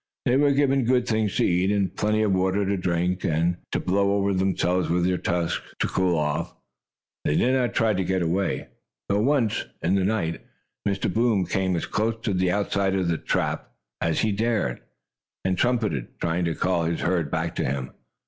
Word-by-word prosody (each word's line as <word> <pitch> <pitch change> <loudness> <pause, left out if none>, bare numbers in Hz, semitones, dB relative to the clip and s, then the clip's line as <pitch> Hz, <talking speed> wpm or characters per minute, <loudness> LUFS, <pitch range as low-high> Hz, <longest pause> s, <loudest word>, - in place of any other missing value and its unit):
They 125 - +3
were 140 +1 +4
given 140 -1 +2
good 125 0 +2
things 110 -3 0
to - - +2
eat, 90 +2 +2
and 95 -3 0
plenty 105 +1 +1
of 105 - +2
water 95 +2 +1
to 100 +1 0
drink, 90 0 -1
and 85 +2 +1
to - - 0
blow 100 +2 +1
over 100 0 +1
themselves 90 -1 +1
with 85 +1 +2
their 90 0 +1
trunks, 85 -1 -1 0.2
to - - 0
cool 90 -2 +1
off. 75 -1 -2 0.7
They 75 - +1
did 130 - +3
not 125 -2 +1
try 110 -2 +3
to 95 -1 0
get 95 0 0
away, 90 +4 -1 0.4
though 100 - +2
once, 125 -3 +1 0.2
in 85 +3 +2
the 95 -1 +2
night, 95 -5 -1 0.5
Mr. 95 -2 -1
Boom 110 -5 +2
came 95 +1 0
as 85 - -2
close 110 +2 0
to 105 - 0
the 90 0 +1
outside 100 0 0
of 95 -3 0
the 85 - 0
trap, - - 0
or - - -29
stockade, 80 - -6
as 80 - 0
he 110 - +1
dared, 105 - 0 0.6
and 95 0 +2
trumpeted, 105 - -1
trying 85 +1 0
to 85 -1 -1
call 85 -3 0
his 85 0 -1
herd 85 -4 0
back 80 +2 -2
to - - 0
him. 65 -1 -2
95 Hz, 205 wpm, -25 LUFS, 85-105 Hz, 0.7 s, were